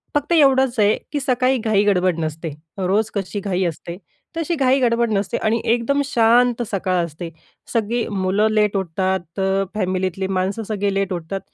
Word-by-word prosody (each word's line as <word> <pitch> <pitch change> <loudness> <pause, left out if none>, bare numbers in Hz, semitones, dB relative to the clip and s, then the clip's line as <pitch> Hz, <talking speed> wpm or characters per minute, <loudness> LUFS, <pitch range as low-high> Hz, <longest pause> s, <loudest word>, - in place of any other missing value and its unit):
फक्त 290 +3 -1
एवढंच 265 -6 +4
आहे, 210 0 +4
की 290 - -1
सकाळी 255 -1 +1
घाई-गडबड 195 -5 +2
नसते. 160 +1 -3 0.3
रोज 200 +4 +1
कशी 200 +1 -3
घाई 190 -2 -1
असते, 170 +1 -5 0.4
तशी 330 +1 -1
घाई-गडबड 250 -4 +2
नसते 195 -1 -1
आणि 225 +1 0
एकदम 240 +5 +1
शांत 240 -1 +3
सकाळ 185 -3 0
असते. 165 +1 -8 0.4
सगळी 230 +1 0
मुलं 200 +1 +1
लेट 210 -1 +2
उठतं, 190 +1 -1
फॅमिलीतली 185 -1 -1
माणसं 195 +3 -1
सगळे 205 -2 -2
लेट 195 -1 -1
उठतात, 175 +3 -4
205 Hz, 145 wpm, -20 LUFS, 185-235 Hz, 0.4 s, एवढंच